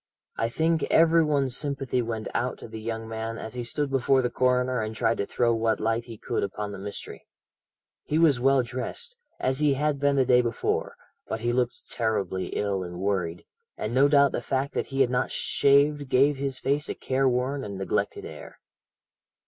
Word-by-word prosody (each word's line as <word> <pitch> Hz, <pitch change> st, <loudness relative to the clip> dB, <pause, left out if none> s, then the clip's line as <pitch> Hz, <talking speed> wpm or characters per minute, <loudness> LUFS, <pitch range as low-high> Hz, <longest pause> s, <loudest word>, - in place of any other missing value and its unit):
I 115 Hz, -, 0 dB
think 160 Hz, +5 st, +1 dB
every 165 Hz, 0 st, +5 dB
one's 140 Hz, -4 st, +1 dB
sympathy 135 Hz, -3 st, -1 dB
went 115 Hz, -2 st, -4 dB
out 125 Hz, +1 st, -1 dB
to -, -, -10 dB
the 110 Hz, 0 st, -8 dB
young 115 Hz, 0 st, -4 dB
man 115 Hz, 0 st, -4 dB
as 110 Hz, -, -7 dB
he 125 Hz, -1 st, -4 dB
stood 140 Hz, +4 st, -2 dB
before 135 Hz, 0 st, +3 dB
the 125 Hz, -, 0 dB
coroner 125 Hz, -1 st, +1 dB
and 110 Hz, 0 st, -4 dB
tried 115 Hz, +1 st, +1 dB
to 100 Hz, -, -1 dB
throw 120 Hz, -1 st, +1 dB
what 115 Hz, 0 st, +1 dB
light 115 Hz, +2 st, 0 dB
he 115 Hz, -2 st, -9 dB
could -, -, -2 dB
upon 100 Hz, +1 st, -3 dB
the 100 Hz, -, -7 dB
mystery. 100 Hz, +1 st, -8 dB, 0.8 s
He 150 Hz, -, 0 dB
was 155 Hz, -6 st, +4 dB
well 135 Hz, 0 st, +4 dB
dressed, 130 Hz, -, -5 dB, 0.2 s
as 130 Hz, +1 st, 0 dB
he 150 Hz, -2 st, +3 dB
had 145 Hz, 0 st, 0 dB
been 140 Hz, 0 st, +2 dB
the 135 Hz, -2 st, +3 dB
day 125 Hz, 0 st, +5 dB
before, 120 Hz, -1 st, -2 dB, 0.3 s
but 110 Hz, -, -4 dB
he 120 Hz, +1 st, 0 dB
looked 125 Hz, -1 st, -2 dB
terribly 100 Hz, -5 st, -1 dB
ill 100 Hz, -2 st, -1 dB
and 90 Hz, -1 st, -6 dB
worried, 90 Hz, -4 st, -2 dB, 0.3 s
and 110 Hz, -, -3 dB
no 135 Hz, +3 st, +5 dB
doubt 140 Hz, -2 st, +5 dB
the -, -, -2 dB
fact 135 Hz, +3 st, -2 dB
that -, -, -2 dB
he 135 Hz, -1 st, -1 dB
had 125 Hz, -2 st, +3 dB
not 125 Hz, -, 0 dB
shaved 140 Hz, 0 st, +2 dB
gave 140 Hz, +3 st, +4 dB
his 135 Hz, -1 st, -3 dB
face 145 Hz, +3 st, -1 dB
a -, -, -3 dB
careworn 130 Hz, +1 st, 0 dB
and 100 Hz, -2 st, -6 dB
neglected 95 Hz, -, -2 dB
air. -, -, -10 dB
125 Hz, 195 wpm, -26 LUFS, 110-140 Hz, 0.8 s, every